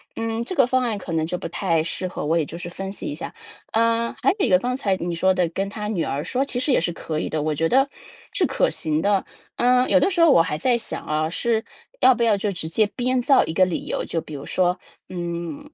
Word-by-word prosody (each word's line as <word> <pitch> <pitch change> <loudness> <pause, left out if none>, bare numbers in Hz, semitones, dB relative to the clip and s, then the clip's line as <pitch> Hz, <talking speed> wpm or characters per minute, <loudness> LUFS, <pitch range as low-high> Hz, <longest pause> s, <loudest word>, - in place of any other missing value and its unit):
嗯， 225 0 -2
这 370 - -3
个 270 -7 +4
方 255 0 +2
案 230 -3 0
可 185 - -7
能 160 -1 +1
就 175 +2 -3
不 - - -4
太 165 -1 0
适 185 +2 -3
合， 180 - -5
我 165 +2 +2
也 160 - +2
是 - - -5
就 165 - -8
是 175 - -6
分 195 +2 -6
析 200 - -6
一 145 - -4
下。 165 - -7 0.4
呃， 230 +1 +1
还 - - +4
有 - - +2
一 - - 0
个 180 -2 +5
刚 250 +4 -2
才 200 -8 +1
你 175 -1 -3
说 190 +3 +3
的 180 -2 +1
跟 195 +4 -2
他 210 +1 -5
女 185 -7 -1
儿 140 0 -2
说， 255 - -1
其 245 - -3
实 270 +3 0
也 - - +4
是 175 - -1
可 155 -2 -4
以 - - -2
的， 155 - -2
我 155 0 -1
觉 165 +2 +1
得 270 +7 +3 0.4
是 - - +2
可 - - +1
行 155 0 -1
的。 200 -1 +2 0.3
嗯， 250 +1 +3
有 280 - +5
的 375 +8 +2
时 345 - +1
候 335 - +7
我 215 - +6
还 150 - -2
在 240 +9 +2
想 230 - -6
啊， 155 +1 0
是 225 +4 0 0.4
要 260 - +7
不 240 - -5
要 225 -3 +4
就 200 +1 -1
直 165 -3 -5
接 215 +6 +3
编 255 0 +1
造 270 +2 +5
一 160 - -4
个 185 +2 +4
理 180 - -3
由， - - -2
就 165 - -2
比 155 - -9
如 140 0 -7
说， 180 -1 +1 0.3
嗯， 175 - -5
195 Hz, 295 characters per minute, -23 LUFS, 165-245 Hz, 0.4 s, 候